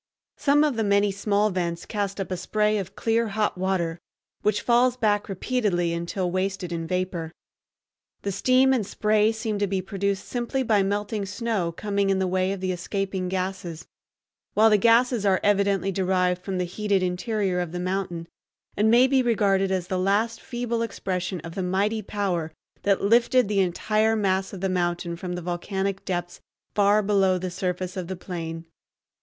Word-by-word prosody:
Some 290 Hz, +1 st, +4 dB
of 290 Hz, -6 st, +1 dB
the 225 Hz, -, +1 dB
many 200 Hz, 0 st, +3 dB
small 205 Hz, +1 st, +1 dB
vents 170 Hz, -2 st, -2 dB
cast 200 Hz, -2 st, -3 dB
up 195 Hz, -, -4 dB
a -, -, 0 dB
spray 210 Hz, +4 st, +1 dB
of 190 Hz, -, -6 dB
clear 230 Hz, 0 st, +1 dB
hot 210 Hz, 0 st, 0 dB
water, 180 Hz, -3 st, -1 dB, 0.4 s
which 210 Hz, 0 st, +1 dB
falls 245 Hz, +1 st, +3 dB
back 205 Hz, -4 st, +1 dB
repeatedly 195 Hz, -4 st, 0 dB
until 170 Hz, +2 st, -2 dB
wasted 185 Hz, -1 st, -2 dB
in 165 Hz, -1 st, -3 dB
vapor. 180 Hz, -2 st, -2 dB, 0.9 s
The 200 Hz, -, -1 dB
steam 255 Hz, +6 st, +4 dB
and 245 Hz, -5 st, +1 dB
spray 210 Hz, +2 st, +2 dB
seem 220 Hz, -2 st, -3 dB
to 205 Hz, -, +1 dB
be 195 Hz, 0 st, -1 dB
produced 195 Hz, +1 st, -2 dB
simply 250 Hz, +2 st, -2 dB
by 215 Hz, -4 st, +3 dB
melting 205 Hz, +1 st, -1 dB
snow 205 Hz, -4 st, -1 dB
coming 200 Hz, +2 st, -1 dB
in 195 Hz, -, +2 dB
the 190 Hz, -, +1 dB
way 185 Hz, +1 st, +1 dB
of 195 Hz, -1 st, -4 dB
the 185 Hz, 0 st, 0 dB
escaping 190 Hz, +1 st, -3 dB
gases, 185 Hz, -3 st, -4 dB, 0.7 s
while 220 Hz, +1 st, +6 dB
the 210 Hz, -, +5 dB
gases 235 Hz, +1 st, +4 dB
are 195 Hz, -2 st, +3 dB
evidently 200 Hz, -1 st, +2 dB
derived 180 Hz, -1 st, +1 dB
from 190 Hz, -2 st, -3 dB
the 180 Hz, -, 0 dB
heated 195 Hz, +1 st, 0 dB
interior 185 Hz, +1 st, -1 dB
of 175 Hz, -2 st, -3 dB
the 175 Hz, -, -4 dB
mountain, 180 Hz, -2 st, -3 dB, 0.5 s
and 210 Hz, +2 st, +3 dB
may 240 Hz, +3 st, +6 dB
be 265 Hz, 0 st, +3 dB
regarded 200 Hz, -5 st, +2 dB
as 185 Hz, -2 st, -1 dB
the 185 Hz, 0 st, -2 dB
last 205 Hz, +5 st, +1 dB
feeble 240 Hz, -2 st, -3 dB
expression 185 Hz, -5 st, -3 dB
of 165 Hz, +1 st, -8 dB
the 190 Hz, -, -3 dB
mighty 200 Hz, +4 st, 0 dB
power 190 Hz, -6 st, -2 dB, 0.3 s
that 200 Hz, -1 st, +1 dB
lifted 235 Hz, +3 st, +4 dB
the 205 Hz, -1 st, +1 dB
entire 215 Hz, +4 st, +1 dB
mass 190 Hz, -2 st, 0 dB
of 190 Hz, -, -8 dB
the 195 Hz, -, +1 dB
mountain 175 Hz, -2 st, -1 dB
from 180 Hz, +1 st, -5 dB
the 175 Hz, -1 st, -5 dB
volcanic 190 Hz, +3 st, -2 dB
depths 175 Hz, -2 st, -3 dB, 0.3 s
far 205 Hz, +1 st, +4 dB
below 195 Hz, -2 st, +3 dB
the 180 Hz, 0 st, -4 dB
surface 180 Hz, 0 st, -3 dB
of 185 Hz, -3 st, -4 dB
the 190 Hz, -, -4 dB
plain. 165 Hz, -2 st, -6 dB
195 Hz, 180 wpm, -25 LUFS, 180-215 Hz, 0.9 s, while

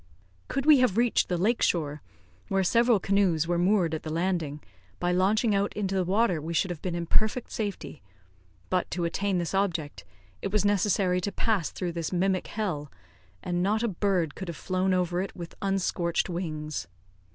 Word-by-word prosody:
Could 275 Hz, 0 st, -2 dB
we 300 Hz, -3 st, +7 dB
have 250 Hz, -6 st, +2 dB
reached 240 Hz, 0 st, +2 dB
the 180 Hz, -, 0 dB
lake 220 Hz, +7 st, +1 dB
shore, 150 Hz, -4 st, 0 dB, 0.5 s
where 195 Hz, -1 st, +1 dB
several 235 Hz, +3 st, +4 dB
canoes 185 Hz, -5 st, +2 dB
were 175 Hz, 0 st, +1 dB
moored 180 Hz, -3 st, +2 dB
at 160 Hz, -, -2 dB
the 155 Hz, -, -6 dB
landing, 165 Hz, -3 st, -1 dB, 0.4 s
by 175 Hz, 0 st, +1 dB
launching 205 Hz, +5 st, +2 dB
out 200 Hz, 0 st, +1 dB
into 195 Hz, -2 st, -2 dB
the 190 Hz, -1 st, +2 dB
water 190 Hz, -2 st, +1 dB
we 165 Hz, +2 st, -4 dB
should 180 Hz, +3 st, +1 dB
have 170 Hz, -, -6 dB
been 180 Hz, -2 st, -3 dB
in 170 Hz, 0 st, -2 dB
perfect 220 Hz, +7 st, +1 dB
safety; 205 Hz, -8 st, -4 dB, 0.7 s
but, 180 Hz, -1 st, +1 dB
to 175 Hz, 0 st, -2 dB
attain 195 Hz, +3 st, 0 dB
this 170 Hz, 0 st, -2 dB
object, 175 Hz, -7 st, -1 dB, 0.4 s
it 195 Hz, -, -3 dB
was 210 Hz, -1 st, +2 dB
necessary 195 Hz, -2 st, +2 dB
to 200 Hz, -, -2 dB
pass 205 Hz, -8 st, 0 dB
through 180 Hz, -2 st, -4 dB
this 165 Hz, -2 st, -3 dB
mimic 185 Hz, +1 st, +1 dB
hell; 170 Hz, -10 st, -3 dB, 0.5 s
and 175 Hz, 0 st, -1 dB
not 210 Hz, +4 st, +1 dB
a -, -, +2 dB
bird 185 Hz, -6 st, 0 dB
could 190 Hz, -, -7 dB
have 170 Hz, -3 st, -5 dB
flown 185 Hz, +3 st, 0 dB
over 180 Hz, -1 st, +1 dB
it 195 Hz, -, -5 dB
with 170 Hz, -2 st, -8 dB
unscorched 185 Hz, -3 st, 0 dB
wings. 155 Hz, -4 st, -4 dB
185 Hz, 185 wpm, -27 LUFS, 170-200 Hz, 0.7 s, we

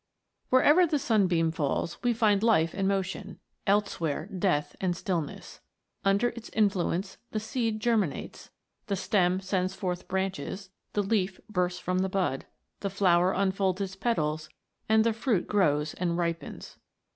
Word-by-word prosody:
WHEREVER 295 Hz, +7 st, +6 dB
the 305 Hz, -2 st, +1 dB
Sunbeam 185 Hz, -, +2 dB
falls 160 Hz, +1 st, -2 dB
we 245 Hz, -, +2 dB
find 215 Hz, -3 st, +3 dB
life 190 Hz, -8 st, +3 dB
and 195 Hz, -1 st, 0 dB
motion; 195 Hz, 0 st, -2 dB, 0.3 s
elsewhere, 170 Hz, -7 st, +1 dB
death 150 Hz, -6 st, 0 dB
and 180 Hz, -2 st, 0 dB
stillness. 170 Hz, -7 st, -4 dB, 0.4 s
Under 200 Hz, +5 st, +3 dB
its 235 Hz, -1 st, -9 dB
influence 195 Hz, -3 st, 0 dB
the 215 Hz, -, -2 dB
seed 220 Hz, 0 st, -2 dB
germinates, 215 Hz, -8 st, -1 dB, 0.4 s
the 200 Hz, -, 0 dB
stem 185 Hz, -1 st, +2 dB
sends 190 Hz, -1 st, -1 dB
forth 180 Hz, -2 st, -3 dB
branches, 190 Hz, 0 st, -3 dB, 0.2 s
the 205 Hz, -, +1 dB
leaf 195 Hz, -2 st, 0 dB
bursts 180 Hz, -3 st, -1 dB
from 185 Hz, +1 st, -1 dB
the 190 Hz, +1 st, 0 dB
bud, 185 Hz, -8 st, -1 dB, 0.3 s
the 200 Hz, -, -2 dB
flower 185 Hz, -2 st, +3 dB
unfolds 190 Hz, -1 st, +1 dB
its 190 Hz, -1 st, -3 dB
petals, 155 Hz, -8 st, -1 dB, 0.4 s
and 220 Hz, 0 st, +5 dB
the 230 Hz, 0 st, +2 dB
fruit 225 Hz, -4 st, 0 dB
grows 150 Hz, -7 st, +1 dB
and 170 Hz, -1 st, -1 dB
ripens. 170 Hz, -1 st, -4 dB
190 Hz, 145 wpm, -28 LUFS, 175-210 Hz, 0.4 s, WHEREVER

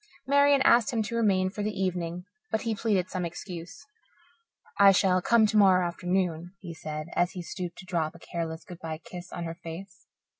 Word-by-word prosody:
Marian 280 Hz, 0 st, +4 dB
asked 235 Hz, -4 st, +5 dB
him 225 Hz, -3 st, 0 dB
to 230 Hz, +2 st, -4 dB
remain 190 Hz, -5 st, +2 dB
for 210 Hz, -, -5 dB
the 205 Hz, -1 st, -3 dB
evening, 180 Hz, -2 st, -2 dB, 0.2 s
but 220 Hz, -, -1 dB
he 230 Hz, -, 0 dB
pleaded 210 Hz, -5 st, 0 dB
some 185 Hz, -1 st, -2 dB
excuse. 175 Hz, +6 st, -7 dB, 0.9 s
"I 200 Hz, 0 st, +9 dB
shall 185 Hz, -1 st, +3 dB
come 230 Hz, +3 st, +4 dB
tomorrow 195 Hz, -4 st, +5 dB
afternoon," 180 Hz, -1 st, -2 dB
he 175 Hz, -3 st, -8 dB
said, 155 Hz, 0 st, -6 dB
as 175 Hz, +1 st, +1 dB
he 180 Hz, -, -6 dB
stooped 175 Hz, 0 st, -6 dB
to 185 Hz, -, -10 dB
drop 165 Hz, -3 st, -1 dB
a -, -, -10 dB
careless 165 Hz, -1 st, -5 dB
good 175 Hz, -2 st, -10 dB
bye 160 Hz, -1 st, -5 dB
kiss 180 Hz, 0 st, -9 dB
on 175 Hz, -, -5 dB
her 165 Hz, +1 st, -6 dB
face. 180 Hz, +3 st, -9 dB
185 Hz, 190 wpm, -28 LUFS, 170-205 Hz, 0.9 s, I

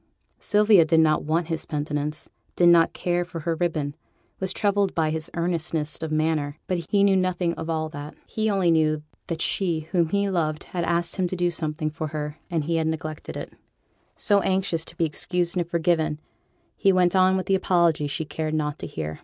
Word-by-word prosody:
Sylvia 210 Hz, -3 st, +5 dB
did 160 Hz, 0 st, +3 dB
not 155 Hz, -2 st, +3 dB
want 165 Hz, +3 st, +1 dB
his 165 Hz, -1 st, -3 dB
penitence, 150 Hz, 0 st, -3 dB, 0.3 s
did 175 Hz, -1 st, +5 dB
not 170 Hz, -1 st, +5 dB
care 175 Hz, 0 st, -1 dB
for 175 Hz, -2 st, -7 dB
her 165 Hz, +2 st, -1 dB
ribbon, 155 Hz, -4 st, -1 dB, 0.5 s
was 190 Hz, -1 st, -1 dB
troubled 200 Hz, -1 st, +1 dB
by 155 Hz, -2 st, +1 dB
his 160 Hz, +1 st, -4 dB
earnestness 165 Hz, -3 st, -1 dB
of 160 Hz, -1 st, -3 dB
manner 155 Hz, -2 st, 0 dB
but 180 Hz, -2 st, -1 dB
he 200 Hz, -1 st, +3 dB
knew 200 Hz, -1 st, +5 dB
nothing 185 Hz, -2 st, +1 dB
of 160 Hz, -1 st, -6 dB
all 160 Hz, -1 st, -1 dB
that; 145 Hz, 0 st, -8 dB
he 220 Hz, 0 st, -1 dB
only 190 Hz, -4 st, +2 dB
knew 155 Hz, -2 st, +2 dB, 0.2 s
that 165 Hz, -1 st, -3 dB
she 170 Hz, -5 st, 0 dB
whom 170 Hz, -4 st, +2 dB
he 200 Hz, +2 st, +1 dB
loved 160 Hz, -5 st, -1 dB
had 175 Hz, -2 st, -4 dB
asked 170 Hz, +1 st, -1 dB
him 185 Hz, -2 st, +1 dB
to 185 Hz, -, -4 dB
do 175 Hz, -1 st, +1 dB
something 155 Hz, -1 st, -2 dB
for 155 Hz, +1 st, -4 dB
her, 150 Hz, 0 st, -5 dB
and 165 Hz, -4 st, 0 dB
he 165 Hz, +2 st, 0 dB
had 160 Hz, -1 st, 0 dB
neglected 155 Hz, -1 st, -4 dB
it; -, -, -7 dB, 0.6 s
so, 205 Hz, -1 st, +3 dB
anxious 185 Hz, -4 st, 0 dB
to -, -, -12 dB
be 165 Hz, -, +2 dB
excused 175 Hz, +3 st, 0 dB
and 175 Hz, -2 st, -1 dB
forgiven, 160 Hz, -3 st, +1 dB, 0.6 s
he 195 Hz, -, +3 dB
went 180 Hz, -1 st, +3 dB
on 185 Hz, 0 st, +4 dB
with 185 Hz, -, -2 dB
the 195 Hz, -, +1 dB
apology 170 Hz, -5 st, +2 dB
she 145 Hz, +2 st, -3 dB
cared 155 Hz, +1 st, -3 dB
not 150 Hz, -1 st, -2 dB
to -, -, -5 dB
hear. 80 Hz, -1 st, -5 dB
165 Hz, 205 wpm, -25 LUFS, 155-180 Hz, 0.6 s, Sylvia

